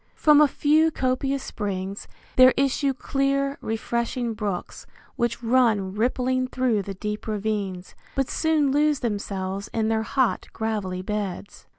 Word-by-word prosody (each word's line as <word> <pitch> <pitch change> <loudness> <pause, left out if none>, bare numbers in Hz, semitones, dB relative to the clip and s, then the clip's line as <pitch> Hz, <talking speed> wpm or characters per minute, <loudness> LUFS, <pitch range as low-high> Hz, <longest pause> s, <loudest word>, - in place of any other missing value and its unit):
From 300 -1 +5
a 300 - +7
few 305 +3 +3
copious 270 -1 -1
springs 195 -1 -4 0.3
there 255 0 +7
issue 275 +1 +2
clear, 275 +1 -1
refreshing 235 +1 -2
brooks, 205 -4 -5 0.3
which 240 0 -1
run 225 -6 +2
rippling 255 +3 0
through 255 -5 0
the 195 0 -6
deep 210 +3 -5
ravines, 205 -3 -3 0.2
but 270 -1 +1
soon 310 -4 +1
lose 295 0 +2
themselves 200 -3 -3
in 220 -1 +1
their 220 0 +1
hot, 255 +2 0
gravelly 205 -5 -3
beds. 200 -1 -5
235 Hz, 130 wpm, -24 LUFS, 205-270 Hz, 0.3 s, a